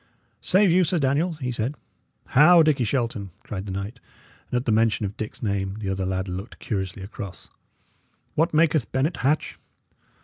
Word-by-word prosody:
"Save 195 -1 +4
you, 185 +2 +5
Sir 180 +1 +1
Daniel," 150 +5 +1
he 130 -5 -4
said. 120 +4 -2 0.5
"How! 165 +5 +7
Dickie 145 -5 +2
Shelton!" 115 -4 -1
cried 100 -1 -6
the - - -4
knight; 100 +6 -5 0.5
and 125 - 0
at 125 - -2
the 115 - +1
mention 110 -1 +2
of 100 +1 -5
Dick's 110 - -6
name 100 -2 -1
the 105 -3 -4
other 95 -1 -1
lad 95 0 -2
looked 95 +5 -6
curiously 95 -3 -4
across. 100 -3 -8 0.8
"What 165 +3 +2
maketh 155 -4 +2
Bennet 140 +6 0
Hatch?" 145 +4 0
120 Hz, 170 wpm, -24 LUFS, 100-150 Hz, 0.8 s, How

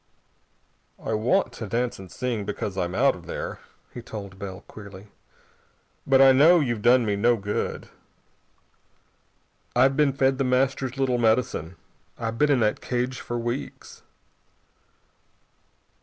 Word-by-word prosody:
"I 110 - -4
want 120 - +1
to 110 - -6
dance 120 +2 -2
and 95 -2 -11
sing 120 -4 -3
because 100 -1 -4
I'm 90 -1 -2
out 135 +4 +3
of 85 -1 -13
there," - - -5 0.3
he 120 - -7
told 100 -4 -9
Bell 95 -1 -7
queerly, 100 -1 -12 1.0
"but 135 -1 +5
I 135 0 +8
know 155 +7 +6
you've 120 -7 -1
done 120 +1 +4
me 105 -1 0
no 120 +4 +3
good. 105 0 -3 1.9
I've 130 +2 +4
been 145 -2 +3
fed 135 0 +1
The - - +2
Master's 130 0 0
little 130 -2 +1
medicine. 110 -7 0 0.4
I've 115 -1 -4
been 150 - +3
in 135 -4 +3
that 105 -1 +1
cage 125 +1 -2
for 120 - -4
weeks." 120 +3 -5
120 Hz, 140 wpm, -25 LUFS, 105-130 Hz, 1.9 s, I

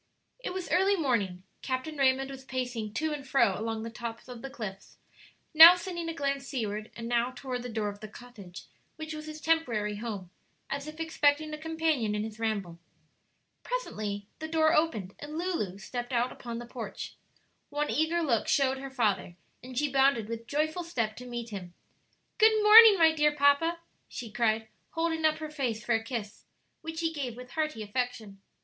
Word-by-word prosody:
It - - -5
was 370 -1 -4
early 385 +3 +4
morning; 215 - 0 0.2
Captain 260 +4 -3
Raymond 270 -1 +2
was 265 -1 -9
pacing 245 -5 -4
to 315 -1 0
and 290 -2 -5
fro 250 -7 +3
along 220 +1 -3
the 230 - -6
top 230 +1 -7
of 245 -2 -9
the 270 - -6
cliffs, 215 -8 -8 0.6
now 325 +3 +11
sending 345 -2 -5
a - - -3
glance 275 -2 -2
seaward, 215 -4 -3
and 230 0 -6
now 240 +1 +1
toward 255 -2 -4
the 245 - -6
door 220 -2 -2
of 205 0 -9
the 215 - -8
cottage 210 -5 -11 0.3
which 315 0 -6
was 305 0 -7
his 310 0 -7
temporary 240 -11 0
home, 205 -5 -6 0.4
as 280 +1 -3
if 310 +1 -9
expecting 310 -1 +1
a - - -3
companion 315 -9 0
in 210 - -1
his 220 0 -7
ramble. 200 -7 -2 0.8
Presently 210 - -4
the 315 - -4
door 315 0 +3
opened 220 - +1
and 300 +2 -7
Lulu 330 - -2
stepped 245 +4 -6
out 245 0 +1
upon 235 -1 -7
the 240 - -6
porch. 240 -1 -7 0.6
One 295 +1 -1
eager 330 +2 +1
look 235 -8 +1
showed 270 -1 +2
her 275 0 -6
father, 215 -8 0 0.3
and 250 +1 -9
she 295 +2 +2
bounded 270 -5 +3
with 230 0 -6
joyful 310 +5 -1
step 230 -10 -2
to 250 - -9
meet 240 -1 -5
him. 180 -4 -7 0.6
"Good 435 0 +6
morning, 430 -1 +10
my 325 -2 +6
dear 300 -1 +2
papa," 285 +4 +3 0.3
she 235 -3 -7
cried, 220 0 +1 0.3
holding 325 -1 0
up 310 0 +3
her 310 -1 -6
face 240 -7 -2
for 235 - +2
a 225 0 +1
kiss, 225 -3 -6 0.4
which 320 0 -5
he 325 -1 0
gave 255 -6 -4
with 250 0 -10
hearty 305 -8 -2
affection. 215 -3 -4
260 Hz, 185 wpm, -29 LUFS, 225-315 Hz, 0.8 s, now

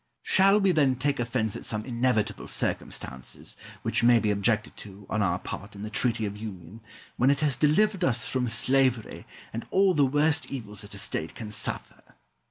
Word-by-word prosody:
Shall 195 +2 +4
we, 195 -2 +3
then, 140 -6 +3
take 140 +2 -1
offence 110 -3 -1
at - - -7
some 110 -1 -3
inevitable 120 -3 -1
circumstances, 65 0 -4 0.3
which - - 0
may 120 0 +6
be 105 -2 +1
objected 105 +2 0
to, 100 -1 -11
on 105 - 0
our 90 -3 +1
part, 100 +2 -8
in 100 - -8
the 105 - -6
Treaty 115 -1 +1
of 100 0 -4
Union, 105 -1 -9 0.4
when 125 - +3
it 140 +1 +2
has 145 -4 +2
delivered 190 +8 +2
us 120 -6 +2
from 125 -2 0
slavery, 130 -1 +2 0.3
and 115 - -5
all 190 -1 +3
the 145 - +3
worst 145 +3 +2
evils 105 -7 -5
that 100 -1 -8
a - - -8
state 80 -4 -3
can 110 -2 -7
suffer? 105 - -3
120 Hz, 185 wpm, -27 LUFS, 105-140 Hz, 0.4 s, may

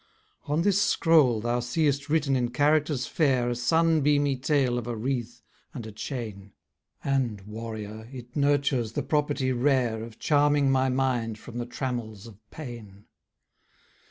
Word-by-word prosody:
On 150 +3 0
this 200 0 +3
scroll 150 - +4
thou 120 +2 0
seest 145 +3 0
written 145 -3 +2
in 120 -2 0
characters 145 0 +1
fair 130 -7 +1
A - - -1
sun 160 +6 +2
beamy 145 -1 +2
tale 130 -2 +1
of 120 - -7
a 120 - -3
wreath, 120 0 -3 0.3
and 120 -4 -6
a 110 - -7
chain; 105 -4 -6 0.5
And, 130 -7 0
warrior, 110 +1 -7
it 125 -2 -10
nurtures 140 -5 +1
the - - -2
property 145 -3 0
rare 125 -3 +1
Of 115 -1 -10
charming 145 -2 +3
my 130 0 +2
mind 125 -4 0
from 120 +2 -8
the 120 - -4
trammels 120 -5 -4
of 110 -4 -13
pain. 115 -9 -10
125 Hz, 150 wpm, -27 LUFS, 115-145 Hz, 0.5 s, scroll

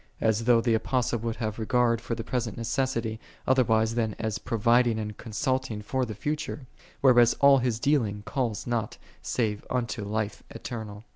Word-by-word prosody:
\l 110 - +3
though 120 -1 +5
the 115 -1 +2
A|)ostle 120 +1 0
would 115 -1 -3
liave 110 -2 -3
regard 115 +1 +2
for 115 - -3
the 115 - -5
present 120 -4 -3
necessity, 115 -2 -1 0.3
otherwise 115 -4 +3
than 110 -3 -1
as 110 -1 -2
pro 115 - -3
viding 120 +1 +3
and 105 -1 -4
consulting 115 0 -2
tor 130 +4 -1
the 110 - -6
future; 150 +3 -3 0.4
\\ 120 -3 +5
all 140 -1 +7
his 120 -3 -1
dealing1 110 -8 +1
calls 120 -7 -2
not 115 -3 -2 0.2
save 105 -4 -1
unto 120 -3 -2
life 105 +1 -3
eternal. 110 -6 -7
115 Hz, 165 wpm, -27 LUFS, 110-125 Hz, 0.4 s, all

